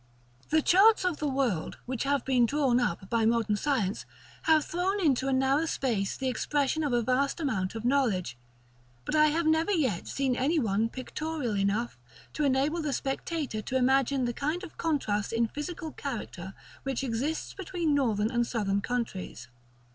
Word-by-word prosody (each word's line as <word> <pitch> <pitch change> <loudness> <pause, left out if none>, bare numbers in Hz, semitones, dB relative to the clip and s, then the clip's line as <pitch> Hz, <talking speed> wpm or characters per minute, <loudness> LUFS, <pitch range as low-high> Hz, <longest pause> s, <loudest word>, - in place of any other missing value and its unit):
§ - - -32
VIII. 315 - +3
The - - -2
charts 395 +2 +5
of 355 -4 0
the 300 - -2
world 260 -11 -1
which 255 0 -3
have 280 -2 +1
been 250 -3 +3
drawn 270 -2 +2
up 190 -5 -1
by 230 +2 +1
modern 225 -2 +2
science 215 -5 -1 0.4
have 315 -2 +4
thrown 370 +4 -1
into 270 -7 +2
a - - +1
narrow 270 +4 +2
space 225 -10 -1
the 265 - -2
expression 290 +4 0
of 290 - 0
a 240 -1 +2
vast 260 +6 +1
amount 220 - -1
of 225 +1 -5
knowledge, 230 - +1 0.7
but - - -3
I 305 0 +5
have 320 +2 0
never 320 +4 +2
yet 265 - 0
seen 270 -2 0
any 285 +7 +1
one 220 -4 +1
pictorial 265 -1 -4
enough 200 - -1 0.3
to 305 - -1
enable 280 +4 +1
the 300 -3 -2
spectator 270 -3 -3
to 260 +5 -1
imagine 265 0 +2
the 240 - -1
kind 305 - -2
of 360 - -9
contrast 220 -11 -1
in 230 0 +2
physical 315 +3 -5
character 195 -10 -6 0.3
which 270 -1 -3
exists 265 +6 -2
between 350 -5 -2
Northern 225 -6 +1
and 240 -1 +1
Southern 200 -4 0
countries. 195 - -4
265 Hz, 175 wpm, -29 LUFS, 230-305 Hz, 0.7 s, charts